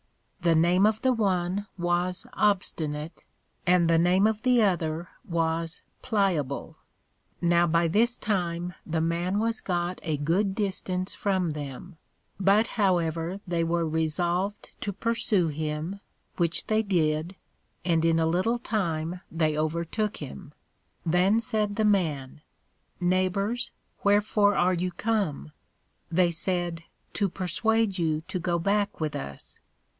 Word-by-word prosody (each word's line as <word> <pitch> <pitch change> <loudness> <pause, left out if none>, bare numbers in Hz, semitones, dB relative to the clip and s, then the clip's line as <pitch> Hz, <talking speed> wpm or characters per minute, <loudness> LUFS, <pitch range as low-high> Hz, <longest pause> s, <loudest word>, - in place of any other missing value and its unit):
The 170 -2 +3
name 175 +5 +4
of 220 +2 -1
the 260 -1 +4
one 195 -2 0
was 175 +1 0
Obstinate, 160 -6 0 0.4
and 175 -1 +4
the 165 0 +4
name 180 +4 +4
of 220 -1 +1
the 250 -2 +4
other 170 -3 0
was 165 -4 -2 0.2
Pliable. 185 - -1 0.6
Now 175 0 +3
by 170 +1 +2
this 230 +8 +2
time 175 -4 -2
the 160 0 -1
Man 170 +4 0
was 225 +1 0
got 175 -1 -2
a 155 -3 -2
good 185 +7 +1
distance 185 -2 -1
from 190 -4 0
them; 150 +4 -7 0.4
but 200 +3 +4 0.2
however 170 -1 +1
they 170 -1 0
were 165 0 0
resolved 175 +5 -1
to 205 - -2
pursue 205 -4 +1
him, 155 +5 -3 0.4
which 170 -1 +1
they 215 0 +2
did, 170 -3 0 0.5
and 165 -2 +2
in 165 0 +3
a 160 - +2
little 185 +9 +1
time 180 -6 -2
they 155 -2 +1
overtook 170 +7 -1
him. 150 +2 -8 0.5
Then 180 +6 +3
said 215 -3 0
the 220 - +1
Man, 155 -10 0 0.6
Neighbors, 185 +5 0 0.3
wherefore 205 0 +3
are 180 +1 +3
you 180 +1 -1
come? 180 - -2 0.6
They 175 0 +3
said, 175 -1 -1 0.3
To 200 -2 +1
persuade 200 +3 0
you 155 -2 0
to 185 - -2
go 175 0 0
back 200 +4 0
with 155 -2 -2
us. 70 0 -7
180 Hz, 130 wpm, -27 LUFS, 165-200 Hz, 0.6 s, name